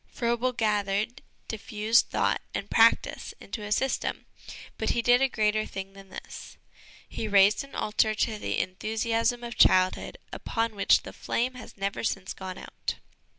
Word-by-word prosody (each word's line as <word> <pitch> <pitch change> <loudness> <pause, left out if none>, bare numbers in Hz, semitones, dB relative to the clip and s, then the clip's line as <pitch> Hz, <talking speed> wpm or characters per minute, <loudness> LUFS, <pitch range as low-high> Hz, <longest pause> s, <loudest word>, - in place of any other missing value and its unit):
Froebel 240 +1 0
gathered 210 +1 0 0.3
diffused 220 +1 +1
thought - - +1
and - - -4
practice - - +3
into 225 - -7
a 210 0 -6
system, 265 +5 -1 0.5
but - - 0
he 235 - +1
did 245 +2 +5
a 270 - +3
greater 215 -2 +1
thing 195 -1 -7
than 195 -1 -14
this. - - -10 0.5
He 220 - -4
raised 200 +2 +5
an 275 - -13
altar 215 0 +1
to 215 0 -1
the - - -2
enthusiasm 225 +5 -1
of 235 0 -6
childhood 185 0 +4 0.2
upon 225 -1 -2
which 200 - +3
the - - -9
flame 250 +2 -1
has 250 -4 -11
never 195 0 -3
since 195 -4 -2
gone 190 -1 -7
out. - - -5
215 Hz, 155 wpm, -27 LUFS, 200-235 Hz, 0.5 s, did